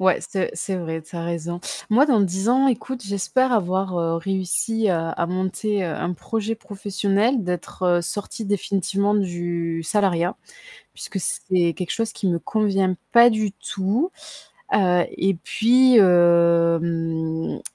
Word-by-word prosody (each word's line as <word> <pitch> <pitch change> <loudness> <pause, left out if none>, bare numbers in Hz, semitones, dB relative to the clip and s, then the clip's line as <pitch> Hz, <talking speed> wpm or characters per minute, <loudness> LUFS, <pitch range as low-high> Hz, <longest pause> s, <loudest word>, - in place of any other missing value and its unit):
Ouais, 185 -1 +3
c'est 190 -2 -2
c'est 195 - -3
vrai, 160 -2 -4
tu 160 - -16
as 170 -1 -4
raison. 170 +1 -4 0.3
Moi, 255 +7 +5
dans 250 -7 +3
10 190 +2 -1
ans, 265 +2 +4
écoute, 255 0 -3
j'espère 220 +6 0
avoir, 185 -3 0
heu, 165 -1 0
réussi, 195 +5 -1
heu, 185 - +3
à 165 +1 -2
monter, 190 +2 -2
heu, - - -2
un 180 - -3
projet 225 +4 -3
professionnel, 205 +2 -1
d'être, 180 +1 -5
heu, 175 -1 +3
sortie 205 +5 -5
définitivement 200 0 0
du 175 -4 -2
salariat 180 -1 0 0.6
puisque 195 - -6
c'est 185 -5 0
quelque 180 -3 -5
chose 225 -1 -2
qui 200 - -3
me 170 -1 0
convient 195 -1 0 0.2
pas 235 0 +8
du 215 -3 -1
tout, 205 - -2 0.6
heu 180 -3 +3
et 195 +1 +1
puis, 250 +2 +4
hem, 170 -3 +2
190 Hz, 145 wpm, -22 LUFS, 170-215 Hz, 0.6 s, pas